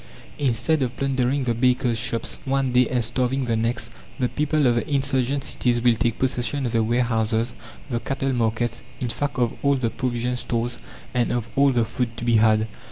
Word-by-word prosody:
Instead 140 +3 +1
of 125 -2 -2
plundering 135 0 0
the 120 -2 +1
bakers' 125 -1 +2
shops 115 0 -1
one 135 -2 0
day, 125 -1 +4
and 120 -3 0
starving 130 +3 0
the 115 -2 0
next, 115 0 -1 0.3
the 125 -2 +1
people 150 +2 0
of 120 - +4
the 120 - -2
insurgent 135 -1 0
cities 120 -1 +1
will 120 -1 +4
take 115 0 0
possession 130 +1 0
of 120 - -1
the 115 -1 +2
warehouses, 115 0 0 0.3
the 120 -4 -2
cattle 135 +2 -2
markets, 115 0 0 0.2
in 125 - -2
fact 145 +4 -3
of 120 -2 +1
all 140 0 +4
the 120 -4 -1
provision 125 0 -1
stores 120 0 -2 0.3
and 120 -1 +1
of 120 -2 -2
all 140 0 +5
the 120 -3 +2
food 115 0 -3
to 120 - -5
be 120 -1 +4
had. 110 0 +4
120 Hz, 195 wpm, -23 LUFS, 115-135 Hz, 0.3 s, all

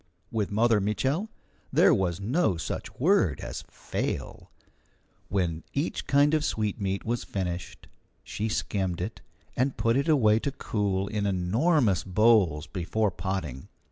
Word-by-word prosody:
With 110 -3 -1
Mother 110 0 +3
Mitchel 135 - 0 0.4
there - - +5
was 90 -2 0
no 110 - +1
such 80 - -5
word 135 - +3
as - - -6
fail. - - -4 0.8
When 85 -4 -1
each 140 +4 -2
kind 140 +2 +4
of 155 -1 +2
sweetmeat 100 -5 -2
was 120 +1 -1
finished, 90 -2 -5 0.4
she 110 +2 -3
skimmed 95 -5 -1
it, 100 +6 -5 0.3
and 130 +2 0
put 115 0 +2
it 140 +4 +1
away 110 -9 +4
to 140 - -2
cool 100 -7 -1
in 105 -1 -1
enormous 100 - +2
bowls 95 -6 +3
before 100 +4 -1
potting. 85 -9 -4
105 Hz, 135 wpm, -27 LUFS, 95-120 Hz, 0.8 s, there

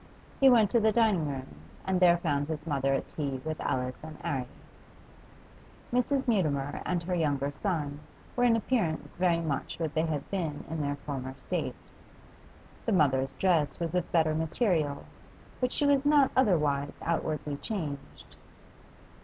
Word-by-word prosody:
He 270 - +7
went 225 -5 +5
to 235 - +4
the 220 0 +3
dining 215 -9 +3
room 135 - -5 0.3
and 190 -1 +1
there 175 -1 +6
found 145 -4 -1
his 155 -1 -4
mother 135 -3 0
at - - -3
tea 140 -4 -3
with 155 0 -3
Alice 125 0 -2
and 155 -1 -8
'Arry. 130 -3 -2 1.5
Mrs. 265 +2 +1
Mutimer 145 - 0
and 175 -2 0
her 180 +2 -2
younger 145 -4 0
son 145 -2 -2 0.4
were 245 - +1
in 240 -2 +5
appearance 215 -8 -1
very 175 -2 +3
much 145 -2 -3
what 160 -3 -2
they 160 +1 +1
had 150 -3 -3
been 165 -7 -2
in 160 -1 -2
their 145 0 -1
former 135 -2 -6
state. - - -4 1.0
The 225 - +2
mother's 135 -6 +2
dress 170 -6 +1
was 170 -1 -2
of 180 -2 -1
better 160 -2 +3
material, 160 - 0 0.5
but 250 -1 0
she 295 - +1
was 280 -1 +4
not 290 -2 +5
otherwise 150 - +2
outwardly 155 -3 -1
changed. 150 -8 -6
160 Hz, 155 wpm, -29 LUFS, 145-195 Hz, 1.5 s, He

